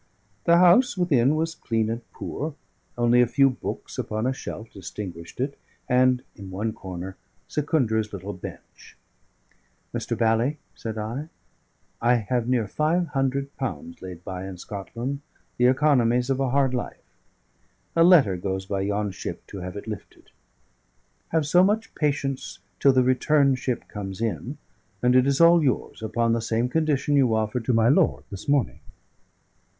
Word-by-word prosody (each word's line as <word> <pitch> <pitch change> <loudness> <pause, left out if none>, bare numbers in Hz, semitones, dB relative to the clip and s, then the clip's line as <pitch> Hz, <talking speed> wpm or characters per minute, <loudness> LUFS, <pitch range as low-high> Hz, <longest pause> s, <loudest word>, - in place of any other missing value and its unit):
The 170 0 +6
house 185 +7 +5
within 145 -6 +3
was 165 +1 -1
clean 115 -7 -1
and 115 +2 -3
poor; 150 0 -5 0.4
only 120 0 +4
a 125 - +4
few 135 +2 +4
books - - -6
upon 110 +2 -2
a 130 - +1
shelf 115 -3 -7
distinguished 90 -2 -8
it, 140 +2 -2 0.3
and 125 0 +3
(in 95 -1 -9
one 105 +4 -2
corner) 95 0 -7 0.3
Secundra's 120 -8 0
little 100 +1 -6
bench. 90 - -11 1.0
"Mr. - - -2
Bally," 115 +6 +2 0.2
said 110 -1 -6
I, 120 +9 -4 0.7
"I 120 +1 +4
have 120 +1 -1
near 120 -4 +1
five 160 - 0
hundred 135 0 -1
pounds 85 - -5
laid 90 -2 -8
by 95 0 -5
in 95 -2 -7
Scotland, 115 +9 -5 0.4
the 125 - +5
economies 125 -2 +3
of 135 - 0
a 135 -1 +1
hard 135 0 +2
life. 125 - -5 0.8
A 165 - +6
letter 150 - +6
goes 95 +1 -3
by 95 0 -2
yon 100 +1 -1
ship 95 - -7
to 100 - -8
have 90 +1 -6
it 100 - -7
lifted. 110 -2 -9 1.0
Have 160 -2 +1
so 175 +5 +5
much 215 +3 +1
patience 140 -3 -2 0.2
till 140 - +6
the 130 -1 +4
return 135 +2 +3
ship 130 -1 -3
comes 95 -2 -6
in, 115 +5 -3 0.5
and 125 +1 +4
it 130 +1 +5
is 140 0 +2
all 170 0 +7
yours, 130 -4 -1
upon 115 +1 +1
the 115 - 0
same 115 +2 0
condition 145 -1 +1
you 130 -5 +4
offered 110 +2 -1
to 125 - +2
my 115 0 +4
lord 155 +6 +3
this 100 -1 -8
morning." 140 -3 +1
125 Hz, 160 wpm, -25 LUFS, 105-140 Hz, 1.0 s, all